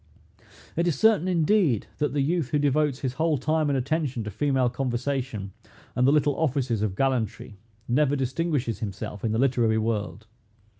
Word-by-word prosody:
It 170 +2 +1
is 160 -6 0
certain, 215 -3 +4
indeed, 170 - +2
that 150 -3 +1
the 145 -2 +1
youth 160 -2 0
who 150 - +1
devotes 145 -1 +1
his 130 -2 -2
whole 160 -2 +2
time 155 +3 0
and 140 - +1
attention 135 -2 -1
to 105 - -5
female 130 +3 +1
conversation, 125 -4 -3 0.4
and 125 +1 +3
the - - +5
little 145 -1 +2
offices 130 -7 0
of 105 -3 -1
gallantry, 115 -5 -1 0.3
never 145 +3 +2
distinguishes 135 - -1
himself 100 -1 -6
in 115 - 0
the 110 - 0
literary 120 -3 +2
world. 110 -1 -2
135 Hz, 165 wpm, -26 LUFS, 115-150 Hz, 0.4 s, the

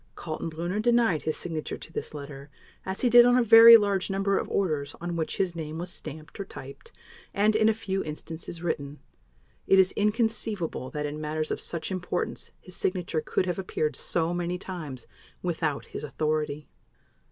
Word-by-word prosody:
Kaltenbrunner 165 +4 -3
denied 235 -8 +3
his 155 - -2
signature 160 -3 -4
to 165 - -13
this - - -5
letter, 140 -1 -9 0.4
as 190 +1 -3
he 255 - +3
did 240 0 +10
on 245 +1 +5
a 250 - +4
very 230 +1 +10
large 200 -3 0
number 195 0 +1
of - - -5
orders 150 -7 -1
on 175 0 -4
which 160 -1 -2
his 180 -3 0
name 160 -1 -5
was 175 +2 -5
stamped 155 +1 -9
or - - -2
typed, 135 -7 -11 0.4
and, 210 +2 +3
in 220 0 +4
a - - +3
few 195 -3 -2
instances, 160 +2 -7
written. 145 -4 -3 0.7
It 195 - +5
is 190 0 +5
inconceivable 210 - -1
that 150 0 -3
in 150 +1 -5
matters 155 +1 -2
of - - -2
such 170 +2 -4
importance 180 -1 -3
his 185 - -9
signature 180 -4 -1
could 185 - 0
have 180 0 -2
appeared 155 -6 -2
so 165 +3 -1
many 175 0 -2
times 155 -10 -7 0.4
without 160 -4 -1
his - - -7
authority. 150 0 -2
175 Hz, 175 wpm, -27 LUFS, 155-195 Hz, 0.7 s, did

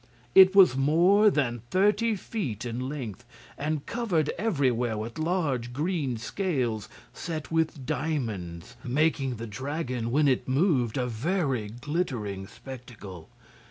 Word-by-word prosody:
It 190 0 +8
was 185 -9 +7
more 175 +10 +5
than 120 - 0
thirty 210 +4 +2
feet 155 - -4
in 125 +2 -3
length 125 -6 -6 0.3
and 150 0 -2
covered 190 -11 0
everywhere 130 - 0
with 115 +6 -5
large 150 -8 -1
green 150 -4 -1
scales 125 - -2 0.2
set 160 -3 -5
with 160 -4 0
diamonds, 110 - -3
making 135 -1 +1
the 115 +1 -6
dragon, 125 +1 -3
when 145 +4 +3
it 130 -2 +1
moved, 130 - +2
a 125 - 0
very 130 - -1
glittering 120 - -3
spectacle. 110 -11 -10
135 Hz, 125 wpm, -27 LUFS, 120-165 Hz, 0.3 s, It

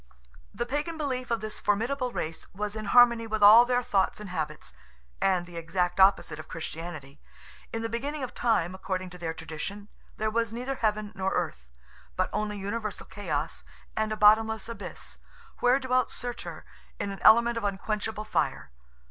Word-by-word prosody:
The 240 +4 -3
Pagan 295 +6 -2
belief 255 -5 -2
of 230 -2 0
this 215 0 -6
formidable 245 +5 0
race 160 -6 -5
was 210 +1 -3
in 215 0 -5
harmony 235 +1 +6
with 220 -1 -1
all 220 +4 +10
their 250 0 +1
thoughts 195 -3 +1
and 210 -3 -8
habits, 155 - -4 0.5
and 185 -2 +2
the 175 -1 -10
exact 180 +2 -1
opposite 190 -5 +4
of 155 - -9
Christianity. 160 -3 -7 0.5
In 225 0 -3
the - - 0
beginning 275 +6 -3
of 255 - -5
time, 220 -7 +1
according 185 -1 -4
to 180 - -11
their 165 -1 -3
tradition, 200 +7 -6 0.3
there 215 0 0
was 230 0 0
neither 250 +4 -3
heaven 215 -4 -1
nor 190 -1 -1
earth, - - -3 0.5
but - - 0
only 210 -1 -2
universal 205 +2 -4
chaos 160 -6 -3 0.3
and 220 0 0
a 215 - -2
bottomless 220 +1 +4
abyss, 230 - -8 0.4
where 250 +2 +4
dwelt 255 -1 +1
Surtur 245 -1 -6 0.3
in 200 - -2
an 195 - -7
element 235 +1 +6
of 230 - -3
unquenchable 210 +2 -2
fire. 215 - -1
215 Hz, 170 wpm, -28 LUFS, 185-235 Hz, 0.5 s, all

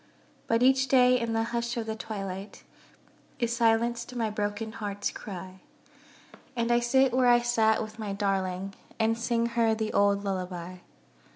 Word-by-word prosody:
But 230 +1 +2
each 265 +1 +4
day 250 -1 +5
in 230 -1 -2
the 225 0 +1
hush 235 0 -2
of 230 - -2
the 220 0 -3
twilight, 195 -2 -6 0.7
Is 235 -1 -1
silenced 235 +1 +1
my 225 -3 -1
broken 210 +1 -3
heart's 205 -2 -4
cry; 185 -2 -8 1.0
And 235 0 0
I 240 - +4
sit 260 +2 +3
where 255 0 +3
I 240 0 +6
sat 225 -2 +2
with 215 +1 -10
my 210 -2 -4
darling, 195 -1 -2 0.3
And 225 +1 +2
sing 230 0 0
her 230 -1 +2
the 220 0 -3
old 200 0 +3
lullaby. 185 -2 -4
225 Hz, 160 wpm, -28 LUFS, 200-235 Hz, 1.0 s, I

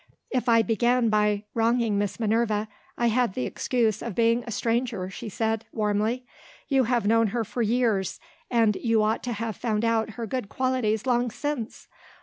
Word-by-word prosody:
"If 250 -1 0
I 230 -1 +5
began 235 +2 +2
by 210 -1 +2
wronging 230 -2 +2
Miss 205 +1 -2
Minerva, 220 -1 +1 0.3
I 240 - +1
had 235 -3 +1
the 125 - -1
excuse 225 - 0
of 230 -5 -5
being 230 +1 +3
a - - -4
stranger," 230 -4 -1
she 225 +2 -7
said, 220 +1 -1
warmly. 215 +4 0 0.4
"You 270 -3 +3
have 240 -2 +1
known 225 +1 +4
her 230 +3 -1
for 240 +3 -4
years, 225 -4 +1 0.3
and 225 -4 +3
you 225 -3 +2
ought 215 +1 +1
to 245 - -3
have 220 -1 -3
found 225 -2 -1
out 225 -1 +1
her 235 - -3
good 225 -2 -4
qualities 255 -4 0
long 245 -1 +2
since! 270 -1 -4
230 Hz, 175 wpm, -26 LUFS, 215-240 Hz, 0.4 s, I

